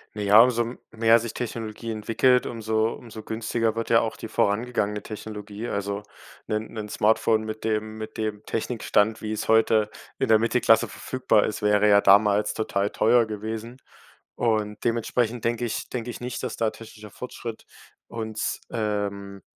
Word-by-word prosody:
Naja, 105 +1 +6
umso 120 0 +3 0.2
mehr 115 +1 +4
sich 115 -1 -5
Technologie 115 -1 -5
entwickelt, 115 +4 +2
umso 110 -1 0
umso 110 -2 -10
günstiger 110 0 -1
wird 115 - -3
ja 115 - +6
auch 110 - -2
die 110 - -7
vorangegangene 105 -1 0
Technologie. 105 +1 -7
Also 100 0 -3 0.4
'nen 110 +1 -3
'nen 110 -2 -5
Smartphone 110 +1 +2
mit 110 0 -6
dem 110 0 -2
mit 110 - -7
dem 110 -1 -3
Technikstand, 110 -2 0
wie 110 0 -4
es 110 - -4
heute 110 -1 +4 0.3
in - - 0
der 110 -1 +6
Mittelklasse 115 0 +3
verfügbar 130 -5 +1
ist, 105 - -3
wäre 105 0 +3
ja 100 -1 +6
damals 105 +1 +4
total 100 -2 -1
teuer 115 +1 +3
gewesen 110 +3 -5 0.6
und 110 -3 -1
dementsprechend 115 0 0
denke 120 +1 0
ich 115 - -4
denke 120 -1 -4
ich - - -6
nicht, 125 0 -5
dass - - -4
da 115 -1 +1
technischer 110 -2 -12
Fortschritt 115 -1 -7 0.4
uns, 110 -2 -3
ähm 100 -2 -3
110 Hz, 155 wpm, -25 LUFS, 105-115 Hz, 0.6 s, Naja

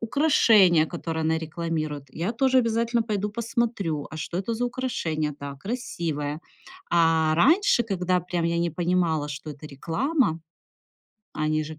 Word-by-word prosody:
украшение, 220 - +4
которое 165 -1 -4
она 160 0 +1
рекламирует, 155 -2 -4
я 180 +8 -3
тоже 260 +1 +3
обязательно 230 0 +1
пойду 210 -2 -2
посмотрю- 225 -9 -2
а 155 - -7
что 170 +2 -4
это 195 +5 -2
за 245 +2 -1
украшение? 165 - -2
Да, 140 -1 -6
красивое. 165 - -4 0.5
А, 160 -2 +3
раньше, 300 - +4
когда 185 -3 0
прям 175 -1 -2
я 170 0 0
не 170 0 +1
понимала, 170 -2 0
что 145 +1 -7
это 150 +1 -10
реклама, 165 - -1 0.9
а 155 - -4
они 155 0 +1
же 155 0 -9
170 Hz, 150 wpm, -25 LUFS, 155-230 Hz, 0.9 s, украшение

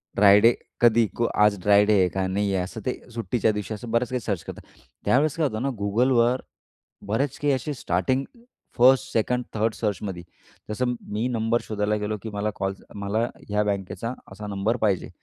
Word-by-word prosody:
Dry 100 0 +7
day 115 +2 +6 0.3
कधी 115 -1 +5
को 120 - +2 0.2
आज 105 -2 +3
ड्राय 105 +1 +5
डे 105 - +3
आहे 90 - +4
का? 95 +1 -2
नाही 100 +1 0
आहे? 95 -1 +1
असं 110 +5 -7
ते 125 - -2
सुट्टीच्या 115 -1 0
दिवशी 105 +1 -4
असं 110 +2 -7
बऱ्याच 115 +1 +1
काही 125 - -1
सर्च 100 -7 -3
करतात. - - -8 0.4
त्यावेळेस 145 +3 +3
काय 160 - +2
होतं 110 -3 -4
ना 140 - 0
Googleवर 120 +4 +2 0.7
बरेच 130 +7 -1
काही 145 -1 +2
असे 145 +3 -2
स्टार्टिंग 125 +5 0 0.5
फर्स्ट, 130 +2 +5
सेकंड, 125 +3 +1
थर्ड 110 +1 0
सर्चमध्ये, 100 -4 -3 0.5
जसं 125 +3 -1 0.2
मी 110 +4 0
नंबर 115 -1 0
शोधायला 105 0 -1
गेलो 105 +1 -2
की 110 - -4
मला 105 +1 -1
कॉल 95 0 -2 0.2
मला 100 +1 -2 0.3
ह्या 105 0 +1
बँकेचा 100 +2 -3 0.2
असा 105 +2 -8
नंबर 100 +4 -1
पाहिजे 100 -4 +1
110 Hz, 185 wpm, -25 LUFS, 100-120 Hz, 0.7 s, ड्राय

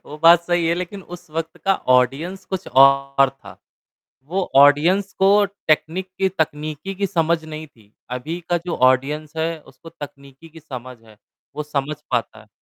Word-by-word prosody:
वो 150 - -9
बात 170 +1 +7
सही 175 -1 +1
है 165 - +2
लेकिन 180 +3 -6
उस 175 -1 -12
वक़्त 165 +2 -4
का 195 - +3 0.2
ऑडियंस 145 +10 -1
कुछ 190 -1 -5
और 135 +1 +5
था, 135 - -15 0.7
वो 180 +5 -3
ऑडियंस 160 +8 +5
को 200 +2 +5 0.2
टेक्निक 170 +4 +1
की 190 0 +2
तकनीकी 155 +1 -3
की 200 +1 -1
समझ 165 -1 0
नहीं 155 0 -8
थी, 110 -6 -25 0.2
अभी 140 +8 -4
का 175 - +2
जो 175 - -2
ऑडियंस 140 +4 +1
है 160 0 -1
उसको 165 - -15
तकनीकी 140 -1 -12
की 160 +1 -14
समझ 130 -4 -9
है। 110 -2 -19 0.4
वो 150 - -3
समझ 150 0 -3 0.2
पाता 120 -3 -2
है। 110 - -18
155 Hz, 170 wpm, -21 LUFS, 140-175 Hz, 0.7 s, बात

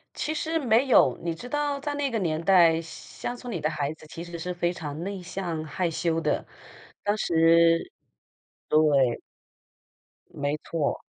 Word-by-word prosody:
其 310 - -2
实 325 +1 -1
没 245 -1 +3
有， 130 - +5
你 170 -1 -1
知 245 - -9
道 290 +1 -1
在 290 +1 -3
那 285 -1 -1
个 230 - -1
年 165 -4 -1
代， 170 -3 +5
乡 205 +8 -7
村 245 0 -7
里 175 - -3
的 155 - +1
孩 150 -1 -2
子 155 - -16
其 165 +2 -8
实 170 -1 -7
是 180 +2 -3
非 175 0 -1
常 150 -3 -6
内 195 -1 -5
向 175 -3 -4
害 170 +3 -2
羞 165 0 0
的， - - -1 0.6
当 205 0 +1
时 165 -1 +4 0.8
对。 145 -5 +3 1.1
没 145 +1 -2
错， 155 -4 -2
170 Hz, 175 characters per minute, -26 LUFS, 160-220 Hz, 1.1 s, 有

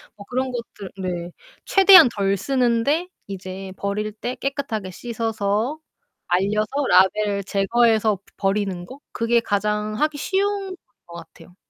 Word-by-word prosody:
뭐 205 - -12
그런 255 +1 -1
것들 230 -5 -7
네. 175 -1 -4 0.3
최대한 390 -7 +8
덜 195 -1 +1
쓰는데 255 - +1 0.2
이제 190 0 -7
버릴 210 +2 -2
때 245 +3 -5
깨끗하게 245 -9 -4
씻어서, 225 - -2 0.5
말려서 205 +4 +1 0.2
라벨을 200 +2 +3
제거해서 215 0 +2 0.2
버리는 195 -3 -1
거? 265 +7 -12
그게 235 +1 +2
가장 210 0 -1
하기 305 -1 0
쉬운 390 +2 -1 0.3
것 170 - -12
같아요. 170 +1 -13
215 Hz, 260 characters per minute, -22 LUFS, 195-250 Hz, 0.5 s, 최대한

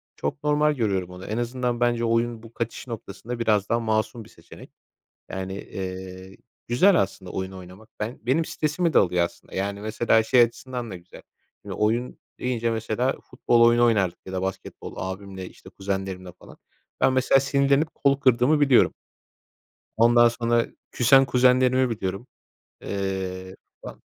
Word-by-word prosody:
Çok 70 - -4
normal 150 0 +2
görüyorum 100 -7 -1
onu. 90 +1 -10
En 110 +2 -3
azından 120 0 -2
bence 120 -1 +1
oyun 115 0 0
bu 115 0 -13
kaçış 115 +2 -5
noktasında 115 +1 -7
biraz 105 -3 +1
daha 115 - +2
masum 110 +1 -1
bir - - -17
seçenek. - - -15 0.6
Yani, 95 0 -5
eee, 95 -1 -7 0.3
güzel 180 +12 +4
aslında 95 -2 -5
oyun 95 0 -4
oynamak. 95 +4 -12
Ben 110 +4 -4
benim 135 +8 +1
stresimi 155 +2 -1
de - - +6
alıyor 90 -2 +2
aslında. 85 - -11
Yani, 100 +1 -3
mesela 110 +1 +2
şey 125 +2 +4
açısından 120 0 -2
da - - -5
güzel. 90 +1 -13 0.4
Şimdi - - -7
oyun 115 +4 -1 0.2
deyince, 120 -2 -1
mesela, 115 +3 -1
futbol 120 -1 +1
oyunu 120 +1 +5
oynardık 100 -6 +1
ya 95 - -8
da 95 - -2
basketbol, 95 0 -6
abimle, 95 0 -6
işte, 95 - -16
kuzenlerimle 95 -1 -4
falan. - - -15 0.4
Ben 130 - +4
mesela 130 +1 +4
sinirlenip 140 +3 +1
kolu 140 -1 +2
kırdığımı 130 +3 +3
biliyorum. 140 -4 +4 1.0
Ondan 120 +1 +6
sonra, 115 0 0 0.3
küsen 135 +3 +5
kuzenlerimi 130 0 +3
biliyorum. 100 +1 -4 0.6
Eee, 95 -1 -4 0.3
ba - - -9
115 Hz, 150 wpm, -24 LUFS, 95-125 Hz, 1.0 s, de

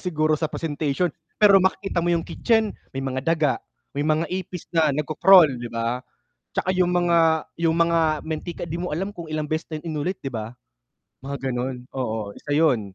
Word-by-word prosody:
siguro 155 -4 0
sa 160 - -1
presentation. 150 +1 -1 0.2
Pero 200 -2 +7
makikita 190 -1 0
mo 170 - -1
'yong 170 -1 +1
kitchen 225 -3 +1 0.2
may 135 - -2
mga 130 -1 -2
daga, 155 -1 +2 0.4
may 140 - -3
mga 155 +2 +2
ipis 185 -2 -4
na 160 -3 +4
nag-ko-crawl, 155 +3 +5
'di 120 - -5
ba? 115 +2 -2 0.3
At - - -57
saka 185 - -1
'yong 180 -1 +2
mga, 175 -1 +3 0.5
'yong 165 0 +3
mga 170 0 +3 0.3
mantika 160 +2 -4
'di 165 - -3
mo 180 -1 -4
alam 190 +6 -3
kung 165 -2 -7
ilang 155 -1 -2
beses 155 +2 -1
na 155 - -3
inulit 165 +3 -3
'di 135 - -4
ba, 115 -2 -5 0.7
mga 140 +1 -4
gano'n, 125 0 -3
oo, 110 -5 -3
isa 150 - -10
'yon. 145 -5 +3
155 Hz, 185 wpm, -24 LUFS, 140-175 Hz, 0.7 s, Pero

